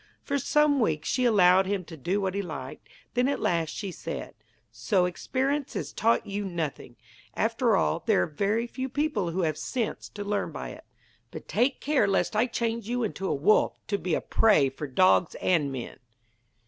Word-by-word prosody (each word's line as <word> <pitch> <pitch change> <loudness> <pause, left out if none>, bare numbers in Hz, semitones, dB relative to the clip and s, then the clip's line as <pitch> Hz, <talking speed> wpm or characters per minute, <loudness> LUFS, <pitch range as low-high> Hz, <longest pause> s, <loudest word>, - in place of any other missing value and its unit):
For 280 -1 -1
some 295 +1 +3
weeks 160 -9 0
she 255 - +1
allowed 190 -4 +5
him 195 -2 -2
to 165 - -10
do 175 +7 -1
what 190 -2 -1
he 200 - -1
liked; 145 -8 -8 0.2
then 245 +1 +2
at 280 - 0
last 165 -2 0
she 195 +4 -5
said: - - -6 0.4
'So 190 -5 +1
experience 265 +10 -2
has - - -4
taught 230 +1 +2
you 205 +1 -3
nothing! 170 -7 -4 0.4
After - - +2
all, 75 -1 +1
there 90 - +4
are - - +1
very 205 +9 -1
few 260 +2 -5
people 265 - -1
who 180 +3 -1
have 155 -2 -1
sense 235 +5 -3
to 205 - -7
learn 205 0 -2
by - - -6
it. - - -11 0.4
But - - -9
take 260 +3 +1
care 285 -7 +2
lest 195 +2 +1
I 225 +4 +3
change 230 -2 -2
you 245 0 0
into 195 -3 -3
a - - 0
wolf, 155 +10 +3
to 200 -1 0
be 180 -3 0
a - - -1
prey 200 -12 +3
for 135 +3 -6
dogs 180 +4 +3
and 155 -6 +1
men!' 130 -3 -7
200 Hz, 195 wpm, -27 LUFS, 170-240 Hz, 0.4 s, allowed